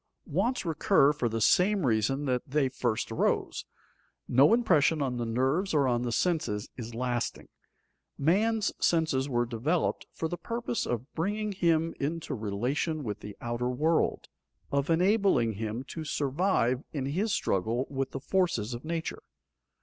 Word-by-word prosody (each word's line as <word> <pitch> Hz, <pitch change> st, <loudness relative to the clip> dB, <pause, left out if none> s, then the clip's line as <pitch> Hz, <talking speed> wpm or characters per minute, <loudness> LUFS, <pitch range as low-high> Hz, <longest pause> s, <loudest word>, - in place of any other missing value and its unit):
Wants 250 Hz, -4 st, -1 dB
recur 150 Hz, -3 st, +3 dB
for 125 Hz, -5 st, -1 dB
the 115 Hz, +1 st, -2 dB
same 185 Hz, -, +3 dB
reason 125 Hz, +5 st, +1 dB
that 125 Hz, -2 st, 0 dB
they 140 Hz, -1 st, +1 dB
first 120 Hz, -3 st, -2 dB
arose. 110 Hz, -, 0 dB, 0.6 s
No 135 Hz, -, +5 dB
impression 165 Hz, -10 st, +3 dB
on 130 Hz, -3 st, -1 dB
the 120 Hz, -1 st, -2 dB
nerves 135 Hz, -, 0 dB
or 140 Hz, -3 st, +3 dB
on 120 Hz, -1 st, +1 dB
the 120 Hz, -1 st, -2 dB
senses 150 Hz, -, 0 dB
is 115 Hz, -2 st, -7 dB
lasting. 120 Hz, -1 st, -2 dB, 0.7 s
Man's 210 Hz, +8 st, +2 dB
senses 155 Hz, -5 st, +1 dB
were 120 Hz, -2 st, +1 dB
developed 130 Hz, +9 st, -1 dB
for 160 Hz, -, -3 dB
the 175 Hz, +1 st, -5 dB
purpose 235 Hz, +4 st, -3 dB
of 120 Hz, +3 st, -4 dB
bringing 210 Hz, +5 st, -1 dB
him 165 Hz, -3 st, +1 dB
into 160 Hz, +4 st, -3 dB
relation 125 Hz, +9 st, -2 dB
with 105 Hz, -3 st, -4 dB
the 105 Hz, -1 st, -9 dB
outer 120 Hz, +1 st, -2 dB
world, 155 Hz, +6 st, +1 dB, 0.4 s
of 140 Hz, +1 st, 0 dB
enabling 180 Hz, -, +3 dB
him 110 Hz, +4 st, -4 dB
to 160 Hz, -, -5 dB
survive 145 Hz, -3 st, 0 dB
in 140 Hz, -4 st, -3 dB
his 185 Hz, +11 st, -1 dB
struggle 115 Hz, -, 0 dB
with 135 Hz, -1 st, -2 dB
the 135 Hz, -, -5 dB
forces 145 Hz, -, 0 dB
of 120 Hz, -, -6 dB
nature. 165 Hz, 0 st, -4 dB
140 Hz, 150 wpm, -29 LUFS, 120-170 Hz, 0.7 s, No